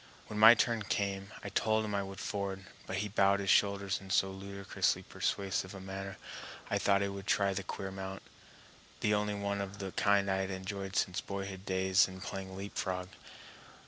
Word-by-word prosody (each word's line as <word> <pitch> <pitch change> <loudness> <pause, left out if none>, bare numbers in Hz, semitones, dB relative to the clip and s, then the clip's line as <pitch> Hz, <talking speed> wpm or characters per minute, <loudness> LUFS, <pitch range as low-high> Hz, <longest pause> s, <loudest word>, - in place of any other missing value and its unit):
When 105 - -5
my 110 +2 +11
turn 115 -1 +2
came 100 0 -1
I 100 - -4
told 110 +2 +2
him 105 - -3
I 100 - +1
would 95 -1 -7
ford, 100 -1 -3 0.2
but 95 - -3
he - - -2
bowed 100 0 +3
his 95 -1 +2
shoulders 100 -1 +3
in 95 - -11
so 95 0 +3
ludicrously 100 0 -1
persuasive 95 -1 -2
a - - -7
manner 95 +1 -6 0.5
I - - +2
thought 100 0 +3
I - - +1
would 100 0 -7
try 100 -1 +3
the 95 - -2
queer 95 +1 -5
mount, 95 0 -6 0.8
the 105 - +3
only 105 0 +1
one 100 0 -1
of 100 0 -5
the 95 -2 -4
kind 100 0 +3
I 95 - +2
had 95 0 -1
enjoyed 95 +1 -4
since 90 -2 +1
boyhood 100 0 -5
days 95 0 +4
in 95 0 -9
playing 95 0 -6
leapfrog. 95 -2 -3
100 Hz, 190 wpm, -33 LUFS, 95-100 Hz, 0.8 s, my